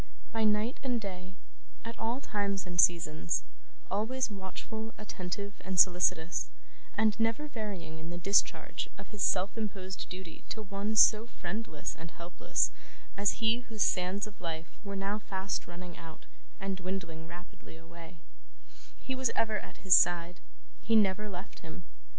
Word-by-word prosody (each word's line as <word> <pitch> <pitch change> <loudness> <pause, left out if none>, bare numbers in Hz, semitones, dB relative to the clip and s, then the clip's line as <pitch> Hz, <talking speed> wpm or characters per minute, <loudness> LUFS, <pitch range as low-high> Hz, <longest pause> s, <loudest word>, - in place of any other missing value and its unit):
By 225 -1 +2
night 215 +4 +2
and 250 -3 +1
day, 185 -3 -6 0.5
at 230 - -4
all 230 +3 0
times 200 -5 -1
and 175 -1 +4
seasons: 155 - +3 0.5
always 225 +5 0
watchful, 220 +3 -6
attentive, 200 0 -4
and 185 -1 0
solicitous, 180 -2 +4 0.5
and 220 -1 +5
never 230 +7 +1
varying 200 - -5
in 160 +1 -7
the 175 - -4
discharge 195 +4 +2
of - - -10
his 210 -2 -7
self 190 +2 +3
imposed 195 -4 -4
duty 180 -3 -8
to 220 - -4
one 200 +2 -2
so 220 +1 +7
friendless 175 -6 -4
and 165 +1 -8
helpless 170 +2 0 0.4
as 205 +2 +1
he 225 +2 +5
whose 220 -3 +2
sands 185 +3 +1
of 210 -3 -12
life 165 -1 -5
were 200 -1 -5
now 200 +2 -1
fast 195 -1 -2
running 175 0 -8
out 165 -2 -11 0.3
and 195 -1 -2
dwindling 175 -3 -4
rapidly 175 -1 -11
away: 165 +1 -12 0.8
he 265 - -3
was 260 -2 +1
ever 215 -1 +2
at - - -12
his 190 - +7
side. 175 0 +5 0.4
He 225 - +2
never 210 0 +4
left 185 +1 -7
him. 165 +2 -9
195 Hz, 150 wpm, -32 LUFS, 175-215 Hz, 0.8 s, so